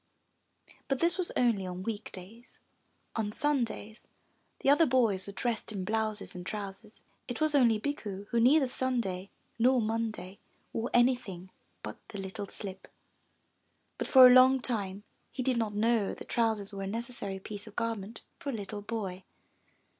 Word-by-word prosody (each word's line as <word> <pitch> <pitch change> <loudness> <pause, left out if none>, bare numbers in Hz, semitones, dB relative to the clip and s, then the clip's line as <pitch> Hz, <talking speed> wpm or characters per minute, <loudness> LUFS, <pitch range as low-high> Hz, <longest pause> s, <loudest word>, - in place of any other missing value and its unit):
But 270 -2 0
this 345 +2 +2
was 360 - 0
only 230 -6 +3
on 180 0 -5
week 220 0 -4
days; 215 +6 -12 0.6
on 215 -2 -1
Sundays 235 -5 -2 0.5
the - - +2
other 315 +3 +5
boys 225 -8 +2
were 200 - -6
dressed 225 +2 -2
in 195 -3 -3
blouses 215 0 -2
and 180 - -6
trousers. 205 +2 -7 0.2
It 245 - -4
was 310 -1 +2
only 235 -6 +4
Bikku 210 -7 -4
who 235 - +1
neither 270 +5 +5
Sunday 235 -8 -2 0.3
nor 255 +2 +5
Monday 220 -4 -2 0.3
wore 230 +2 -2
anything 240 -7 +1 0.3
but - - -6
the 205 - -7
little 195 +1 -5
slip. 195 -2 -8 1.1
But - - -2
for 260 -2 +9
a 250 - +9
long 260 +1 +7
time 205 -5 -3 0.3
he 255 - -3
did 255 -1 +1
not 220 -3 -1
know 220 -1 +2
that - - -10
trousers 220 -4 0
were 195 - -5
a 195 - -3
neces 230 +5 -3
sary 200 -5 -4
piece 205 +2 -8
of 215 - -12
garment 225 -2 -3 0.2
for 285 - -5
a - - -2
little 205 0 -5
boy. 200 -4 -4
225 Hz, 165 wpm, -30 LUFS, 200-245 Hz, 1.1 s, for